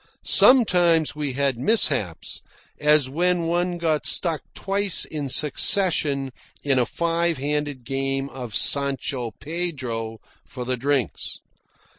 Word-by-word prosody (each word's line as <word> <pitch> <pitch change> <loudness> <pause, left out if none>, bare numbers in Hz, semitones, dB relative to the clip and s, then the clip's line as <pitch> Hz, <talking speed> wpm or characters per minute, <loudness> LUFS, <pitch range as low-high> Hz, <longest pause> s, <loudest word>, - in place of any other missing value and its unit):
Sometimes 175 - +4
we 145 -3 -3
had 135 -2 0
mishaps, 130 - 0 0.4
as 150 -2 +4
when 175 +5 0
one 175 +1 0
got 160 -3 0
stuck 165 -4 0
twice 195 -1 -1
in 145 -3 -5
succession 150 -2 +1 0.3
in 135 -3 +2
a 120 - +1
five 170 +1 0
handed 145 -1 -3
game 135 +2 -2
of 125 -5 -7
Sancho 135 -1 +1
Pedro 130 -8 -4 0.2
for 125 -2 -8
the 130 +1 -1
drinks. 135 0 -2
145 Hz, 115 wpm, -23 LUFS, 130-170 Hz, 0.4 s, Sometimes